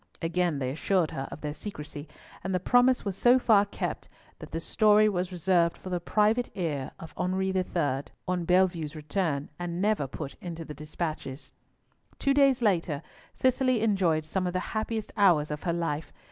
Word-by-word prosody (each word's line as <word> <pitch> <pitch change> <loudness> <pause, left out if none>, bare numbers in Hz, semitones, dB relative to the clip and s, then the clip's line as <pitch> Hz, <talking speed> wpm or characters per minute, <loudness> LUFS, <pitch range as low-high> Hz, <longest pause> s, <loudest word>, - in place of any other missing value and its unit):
Again 170 -1 +1
they 130 -2 -2
assured 170 +3 +1
her 135 0 -4
of - - -8
their 150 -1 -3
secrecy, 150 -4 -7 0.4
and 190 - -1
the - - +2
promise 245 +6 +3
was 195 -2 -2
so 245 +5 +5
far 215 -5 +4
kept 200 - -4 0.3
that - - -9
the 165 - -3
story 215 +4 +4
was 185 -2 -1
reserved 175 -1 +2
for 185 - -8
the 180 - 0
private 215 +7 +2
ear 150 -8 -2
of 165 - -10
Henri 190 +1 0
III. 150 -7 0 0.2
on 180 -1 0
Bellievre's 175 -3 +2
return, 155 -1 -2
and 175 0 -3
never 205 -8 +1
put 135 +1 -6
into 165 -2 -6
the 150 - -7
despatches. 155 -2 -5 0.7
Two 275 - +2
days 275 -3 +4
later, 170 -7 +1 0.3
Cicely 255 -2 +2
enjoyed 185 -8 +2
some 185 +3 -1
of 180 - -2
the 185 - -2
happiest 220 0 -2
hours 170 -7 +4
of 150 - -4
her 170 - +1
life. 165 -2 -2
180 Hz, 175 wpm, -28 LUFS, 155-205 Hz, 0.7 s, so